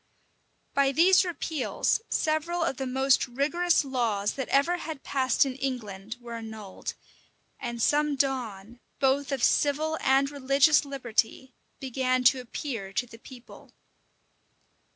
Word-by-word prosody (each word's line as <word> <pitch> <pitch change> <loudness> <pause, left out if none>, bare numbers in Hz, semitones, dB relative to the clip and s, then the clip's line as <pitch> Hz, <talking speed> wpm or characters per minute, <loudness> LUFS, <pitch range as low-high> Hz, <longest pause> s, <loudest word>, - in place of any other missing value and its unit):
By 275 -1 +3
these 355 +7 +5
repeals 335 +2 -1
several 325 +2 0
of 270 - -1
the 265 - -3
most 265 +1 +2
rigorous 305 +6 +1
laws 225 -6 -1
that 265 -2 -4
ever 285 +6 +2
had 320 -5 -7
passed 260 -1 +2
in 270 - -3
England 225 -5 -5
were 240 -1 -9
annulled; 220 -4 -7 0.6
and 235 -1 -5
some 295 +4 +2
dawn, 240 -5 -3 0.2
both 275 +1 +1
of 275 - -2
civil 310 +2 +2
and 275 +1 +3
religious 280 +2 +3
liberty, 260 -1 -2 0.3
began 255 -1 0
to 255 +1 +5
appear 235 -5 -5
to 245 - 0
the 230 -1 -14
people. 250 0 -14
265 Hz, 130 wpm, -27 LUFS, 240-285 Hz, 0.6 s, these